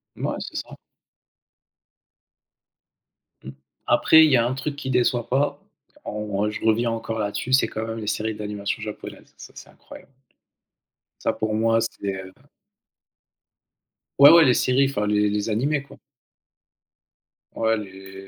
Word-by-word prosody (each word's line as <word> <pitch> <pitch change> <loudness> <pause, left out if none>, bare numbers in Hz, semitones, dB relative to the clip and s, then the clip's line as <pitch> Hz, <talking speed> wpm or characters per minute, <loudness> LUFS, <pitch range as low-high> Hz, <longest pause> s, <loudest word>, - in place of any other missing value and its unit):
Mouais, - - -3
c'est - - -8
ça. - - -7 2.7
Mmh, 65 - -8 0.3
après 160 0 +5
il 155 - +2
y 130 - +5
a 115 - +2
un 125 - -1
truc 140 +2 -4
qui 140 -2 -6
déçoit 120 -1 +1
pas, 140 +2 0 0.5
en 105 -1 -3
je 105 - -7
reviens 115 +1 +2
encore 115 0 -4
là-dessus, 105 +5 -3
c'est 130 -4 +4
quand 110 0 -5
même 115 0 -5
les 105 - -7
séries 110 +1 -2
d'animation 105 +1 -4
japonaises, 105 -1 -9
ça, - - -12
c'est - - -12
incroyable! - - -15 1.1
Ça - - -1
pour 110 0 -2
moi, 115 +1 +2
c'est, 100 -3 -4
heu 95 - -13 1.9
Ouais, 140 +2 +10
ouais, 170 -1 +7
les 125 - +4
séries, 135 +2 +2
enfin, 115 -7 -2
les 105 0 +2
les 105 +2 -2
animés, 140 +7 0
quoi. - - -16 1.6
Ouais, 110 0 +1
les 95 -1 -10
110 Hz, 145 wpm, -23 LUFS, 105-130 Hz, 2.7 s, Ouais